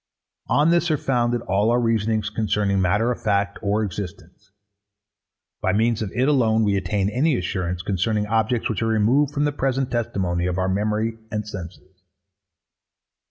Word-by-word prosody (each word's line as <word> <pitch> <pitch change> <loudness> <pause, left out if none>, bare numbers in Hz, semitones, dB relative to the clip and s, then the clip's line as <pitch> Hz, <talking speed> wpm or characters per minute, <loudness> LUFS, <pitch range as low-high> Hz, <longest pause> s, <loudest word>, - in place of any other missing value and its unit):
On 150 +3 +3
this 175 0 +2
are 155 - +2
founded 120 -5 0
all 100 +3 +1
our 120 +1 +3
reasonings 110 -2 0
concerning 105 -3 0
matter 100 +6 +2
of 125 - -5
fact 100 -1 0
or 105 +1 0
existence. 95 0 -7 1.1
By 95 - +1
means 115 +2 +1
of 105 -3 -3
it 130 +2 +2
alone 115 -6 +3
we 100 -2 +2
attain 100 0 0
any 135 +4 +2
assurance 90 -4 -3
concerning 105 +3 0
objects 110 +2 0
which 110 -3 -2
are 115 - +1
removed 115 +7 +2
from 145 0 0
the 145 - +1
present 135 -2 -1
testimony 95 -7 -1
of 90 0 -2
our 95 0 0
memory 105 +3 -1
and 105 -1 -3
senses. 95 -1 -10
110 Hz, 160 wpm, -23 LUFS, 100-120 Hz, 1.1 s, On